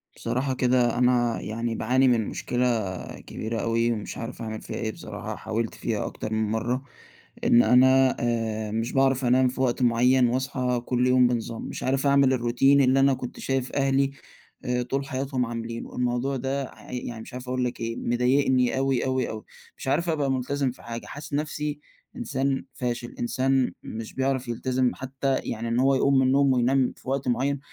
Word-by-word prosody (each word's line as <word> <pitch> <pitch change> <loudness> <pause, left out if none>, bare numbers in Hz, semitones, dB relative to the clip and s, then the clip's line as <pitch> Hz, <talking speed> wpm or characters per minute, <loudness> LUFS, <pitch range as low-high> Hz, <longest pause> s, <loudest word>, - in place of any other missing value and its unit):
بصراحة 130 +2 -1
كده، 125 -2 +2
أنا 120 -1 +2
يعني 115 +1 -3
باعاني 130 +3 +2
من 115 -4 +2
مشكلة 125 0 -1 0.6
كبيرة 115 +1 -4
أوي، 115 +1 +1
ومش 105 -3 -4
عارف 115 +1 -6
أعمل 110 -1 -5
فيها - - -7
إيه 110 -1 -2
بصراحة، - - -7
حاولت 110 +1 -3
فيها 110 -3 -2
أكتر 110 - -5
من 110 -1 0
مرة، 120 +3 -1 0.6
إن 120 - +6
أنا 130 +3 +5
آآ، 110 -2 -1
مش 115 +2 -2
باعرف 135 -1 +2
أنام 130 +1 +4
في 130 +1 -3
وقت 130 0 +1
معين 125 +1 +4
واصحى 125 -1 -1
كل 125 0 +1
يوم 125 -1 +5
بنظام، 115 -1 -3
مش - - -6
عارف 135 +2 +1
أعمل 140 -1 +4
الروتين 130 +3 +3
اللي 130 0 +4
أنا 135 0 +5
كنت 125 -1 -6
شايف 135 -1 -1
أهلي 135 0 +2 0.5
آآ 125 -1 0
طول 135 +3 -2
حياتهم 130 -1 -2
عاملينه، 115 0 -6
الموضوع 125 +2 0
ده 135 +2 -2
ع - - -14
يعني 120 -2 -5
مش - - -11
عارف 125 0 -7
أقول 125 0 -1
لك 125 - -4
إيه، 115 0 -3
مضايقني 125 +1 +2
أوي، 135 -2 +1
أوي، 130 -1 0
أوي، 110 -1 -6 0.3
مش - - -8
عارف 165 +6 +1
أبقى 145 -4 +1
ملتزم 135 +1 -1
في - - -16
حاجة، 115 0 -6
حاسس 145 0 -9
نفسي 150 0 -2 0.4
إنسان 140 - -1
فاشل، 120 -2 -4
إنسان 130 +2 +1
مش 110 0 -7
بيعرف 130 -1 -1
يلتزم 125 +1 0
حتى 135 +1 -2
يعني 115 0 -4
إن 115 +1 0
هو 135 +1 +4
يقوم 140 +1 +3
من 130 - +3
النوم 135 0 +4
وينام 130 +1 +2
في - - -9
وقت 135 0 -1
معين، 135 +3 0
125 Hz, 180 wpm, -26 LUFS, 120-135 Hz, 0.6 s, إن